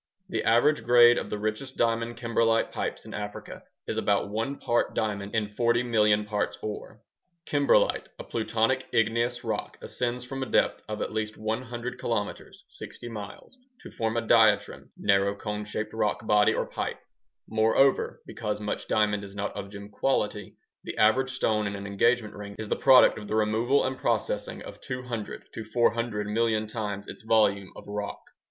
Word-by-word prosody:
The - - -1
average 120 +7 +3
grade 120 0 +7
of - - -6
the 105 - -3
richest 110 +6 -4
diamond 115 0 0
kimberlite 115 -1 +1
pipes - - -4
in - - -9
Africa 105 0 -6 0.3
is - - -3
about 100 0 +1
1 115 +6 -2
part 120 -2 0
diamond 105 -1 -2
in 105 -2 0
40 120 +2 +2
million 105 -3 +3
parts 105 -1 -2
ŌĆ£ore. 105 -1 -5
ŌĆØ - - -19 0.5
Kimberlite, 145 -1 +3
a - - -7
plutonic 115 +3 0
igneous 115 +2 +1
rock, - - -3
ascends 125 0 -3
from 135 +1 -5
a 130 - -2
depth - - +2
of 105 0 -2
at - - -4
least 110 0 -3
100 120 +3 -4
kilometers 105 -3 -4
(60 120 - -9
miles) 105 - -9 0.3
to - - -11
form 115 0 -2
a 115 - 0
diatreme 110 -3 +3
(narrow 100 0 +2
cone 105 +1 -4
shaped 105 +1 -4
rock 110 0 -1
body 105 -1 +4
or - - -1
ŌĆ£pipeŌĆØ). - - -4 0.5
Moreover, 110 +5 +2
because 105 -2 -4
much 105 0 -4
diamond 105 -1 +1
is 100 0 -10
not 100 0 -3
of 100 -1 -6
gem 100 0 -9
quality, 105 -3 -1 0.3
the - - -6
average 130 +5 +4
stone 110 -5 0
in 100 - -4
an 100 0 -6
engagement 105 +2 +1
ring 100 -1 -8
is 110 -1 -6
the - - +1
product 130 -4 +6
of 105 - -9
the 110 - -2
removal 110 +5 +2
and 130 0 -3
processing - - -1
of - - -11
200 125 -4 -6
to 115 - -5
400 115 -1 0
million 110 0 +1
times 105 -2 -4
its - - -9
volume 105 -3 +2
of - - -11
rock. 105 0 -4
110 Hz, 175 wpm, -27 LUFS, 105-120 Hz, 0.5 s, grade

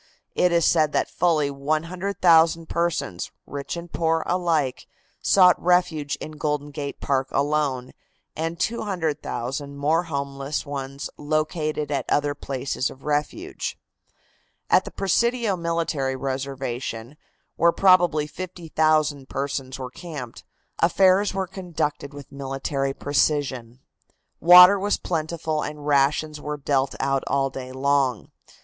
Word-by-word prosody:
It 180 - +2
is 170 -1 +3
said 155 -3 +3
that - - 0
fully 155 -5 +1
100,000 165 +3 +2
persons, 170 - -2 0.2
rich 140 +4 -5
and 170 0 -9
poor 165 -1 +1
alike, 165 -7 0 0.3
sought 180 -2 +5
refuge 165 -5 +1
in 155 - -8
Golden 150 -1 -3
Gate 140 0 -5
Park 135 -1 0
alone, 140 -3 0 0.4
and 165 +2 -3
200,000 155 - -3
more 155 +4 +2
homeless 140 -1 -3
ones 140 -1 -5
located 155 0 -1
at 135 -3 -1
the - - +1
other 145 0 0
places 135 -2 -3
of 135 - -14
refuge. 150 - -3 0.9
At - - +5
the - - -7
Presidio 230 +2 +1
military 165 -6 -1
reservation, 130 -2 -4 0.4
where 170 0 +4
probably 175 -5 +4
50,000 155 -4 -1
persons 135 -1 -3
were 130 -1 -6
camped, 145 -8 -8 0.4
affairs 190 +3 +3
were 190 -1 0
conducted 170 -6 -4
with 145 -1 -11
military 135 0 -3
precision. 135 -4 -1 0.6
Water 180 +3 +9
was 205 +2 +1
plentiful 160 -2 -2
and 150 -1 -6
rations 150 +1 +1
were 150 0 -4
dealt 135 -1 0
out 135 0 0
all 135 -1 +1
day 130 -1 -7
long. 135 -3 0
150 Hz, 120 wpm, -24 LUFS, 140-170 Hz, 0.9 s, Water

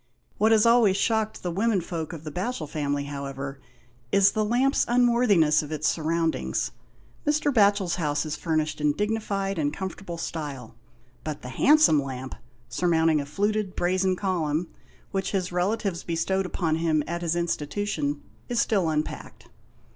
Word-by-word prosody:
What 220 +1 +4
has 220 -1 +5
always 230 -5 +5
shocked 220 +1 0
the 175 - -2
womenfolk 180 -5 -1
of 165 -3 -8
the 155 - -6
Batchel 180 0 -3
family, 145 -1 -2
however, 140 -1 -6 0.5
is 200 0 +5
the 215 -1 0
lamp's 250 +6 +2
unworthiness 235 -11 +4
of 150 0 -8
its 155 -1 -1
surroundings. 165 0 0 0.5
Mr. 295 -1 +1
Batohel's 200 -5 +3
house 150 -3 0
is 150 - -3
furnished 155 -2 -1
in 150 -1 +3
dignified 200 -1 -2
and 145 -1 +1
comfortable 190 -1 -6
style, 145 -8 -5 0.5
but 155 -1 -5
the 125 - -6
handsome 285 - +5
lamp, 130 -1 -6 0.3
surmounting 160 +3 +2
a 140 - -7
fluted 205 +4 -1
brazen 185 +1 +1
column, 170 -4 -1 0.4
which 195 +1 -2
his 185 -2 -1
relatives 185 0 -1
bestowed 185 +3 -1
upon 160 -4 -1
him 160 -2 +1
at 170 +1 -4
his 170 -1 0
institution, 160 -2 -2 0.3
is 240 -1 0
still 195 -8 +2
unpacked. 155 0 -4
175 Hz, 145 wpm, -26 LUFS, 150-205 Hz, 0.5 s, has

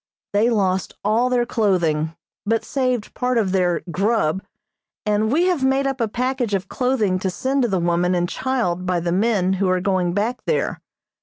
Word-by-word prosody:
They 215 +4 +3
lost 190 -5 0
all 225 +5 +2
their 245 -1 +2
clothing, 170 -9 0 0.3
but 225 +2 0
saved 255 -5 -1
part 250 -1 0
of 205 -5 +1
their 180 -2 +1
"grub," 190 -2 +1 0.6
and 210 +1 +1
we 330 +6 +3
have 355 -7 +1
made 270 +1 +2
up 270 -2 -1
a 230 - +2
package 245 -1 -1
of 190 0 -3
clothing 230 -8 0
to 190 - -1
send 265 +9 -1
to 245 - +2
the 195 -4 0
woman 175 +1 +1
and 175 0 +1
child 185 -8 -1
by 180 -1 +1
the 170 0 -2
men 190 -1 +2
who 190 - +2
are 185 0 +2
going 185 -2 0
back 220 +6 -1
there. 470 - 0
210 Hz, 185 wpm, -21 LUFS, 185-250 Hz, 0.6 s, They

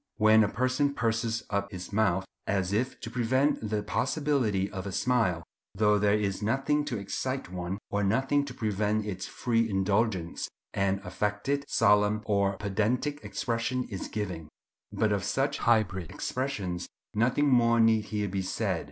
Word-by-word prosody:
When 110 0 +6
a 105 - +1
person 130 +5 0
purses 115 0 0
up 100 0 -1
his 90 +1 -7
mouth, 100 -3 +2 0.2
as 95 -1 0
if 125 +5 -1
to 115 - -6
prevent 125 -1 +1
the 105 -1 -1
possibility 125 -3 0
of 95 -1 -5
a - - -4
smile, 105 -7 +1 0.3
though 105 -1 +3
there 105 +1 +3
is 100 -2 -2
nothing 135 +7 +1
to 130 -6 -2
excite 130 +4 -3
one, 90 +1 -3
or 105 0 +1
nothing 135 +8 +2
to 130 - -7
prevent 105 -2 0
its 95 -3 -4
free 115 -2 0
indulgence, 95 -2 0 0.2
an 100 0 0
affected, 105 +9 -1
solemn, 105 0 +3
or 100 -2 +1
pedantic 115 +9 -1
expression 120 +2 -1
is 95 -4 -5
given; 90 -7 -4 0.4
but 110 -1 +1
of 100 -2 0
such 135 +8 0
hybrid 100 -7 +1
expressions 100 -5 -3 0.3
nothing 125 +7 +2
more 115 -3 +4
need 110 -1 +4
here 105 -1 -2
be 95 0 -2
said. 95 - -1
105 Hz, 155 wpm, -29 LUFS, 100-125 Hz, 0.4 s, When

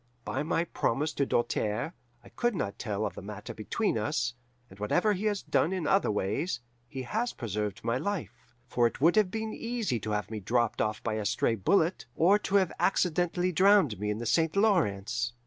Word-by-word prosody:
By 130 - -2
my 160 +2 +1
promise 150 -2 -1
to 140 - 0
Doltaire, 120 +4 0 0.3
I - - -14
could 240 -2 -1
not 100 - -3
tell 105 -2 -2
of - - -3
the - - -8
matter 105 +1 -7
between 115 - -1
us, 120 +3 -1 0.3
and 95 -2 -16
whatever 175 - +2
he 200 +2 -3
has 205 -2 0
done 165 - +1
in 185 -4 -2
other 195 +5 +3
ways, 110 - -1 0.3
he 130 +2 -6
has 225 - -1
preserved 105 -3 -3
my 115 +2 0
life; 200 +2 -5 0.2
for 120 -1 +3
it - - -7
would 165 +5 +4
have 210 -3 +4
been 220 +2 -3
easy 230 - -2
to 110 - -5
have 105 +1 -2
me 110 - -3
dropped 115 +3 0
off 110 0 -1
by 115 - -1
a 105 - -3
stray 115 +1 +1
bullet, 160 - +1
or 195 +6 +5
to 200 - -2
have 190 -4 +4
accidentally 180 0 +1
drowned 185 - +4
me 105 0 -2
in 105 - -1
the 120 - -5
St. 160 - +2
Lawrence. 120 - +1
130 Hz, 200 wpm, -29 LUFS, -, 0.3 s, or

